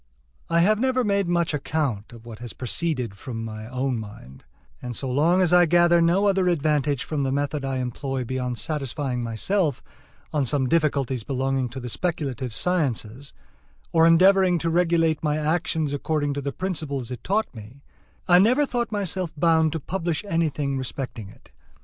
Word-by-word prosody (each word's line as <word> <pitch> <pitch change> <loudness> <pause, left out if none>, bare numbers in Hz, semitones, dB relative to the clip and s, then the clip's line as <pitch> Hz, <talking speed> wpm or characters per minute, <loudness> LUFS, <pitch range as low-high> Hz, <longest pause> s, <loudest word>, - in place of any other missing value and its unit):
I 170 0 +3
have 210 +4 +3
never 260 0 +1
made 200 -3 +1
much 170 -2 +1
account 140 -8 -2
of 115 -1 -13
what 115 -2 -9
has 120 -2 -8
proceeded 125 - -2
from 115 -4 -5
my 110 0 -7
own 130 0 -2
mind; 85 - -11 0.4
and 125 -1 -5
so 135 - -4
long 160 +8 +3
as 175 -1 +2
I 175 -1 +6
gathered 175 0 +4
no 185 +4 +3
other 190 -2 +2
advantage 150 -5 +1
from 150 -2 -3
the 135 -1 0
method 145 +1 -1
I 135 -1 -2
employ 130 +1 -3
beyond 125 0 -3
satisfying 135 0 -2
myself 140 - -1 0.5
on 145 -4 +1
some 130 0 0
difficulties 140 -5 +1
belonging 135 +1 -1
to 130 +3 -7
the 125 - -6
speculative 135 -4 -3
sciences, 140 -4 -1 0.6
or 165 0 +5
endeavoring 185 +2 +5
to 165 - +1
regulate 165 -2 +2
my 150 -1 0
actions 155 -1 0
according 145 0 -1
to 140 - -3
the 140 0 -3
principles 145 -9 -4
it 125 - -7
taught 215 +3 0
me, 115 +5 -12 0.4
I 175 0 +7
never 250 +9 +4
thought 240 -4 -2
myself 190 -4 -2
bound 160 0 +3
to 165 - -2
publish 170 +2 -3
anything 150 -7 -1
respecting 125 -5 -5
it. - - -19
145 Hz, 170 wpm, -24 LUFS, 130-175 Hz, 0.6 s, I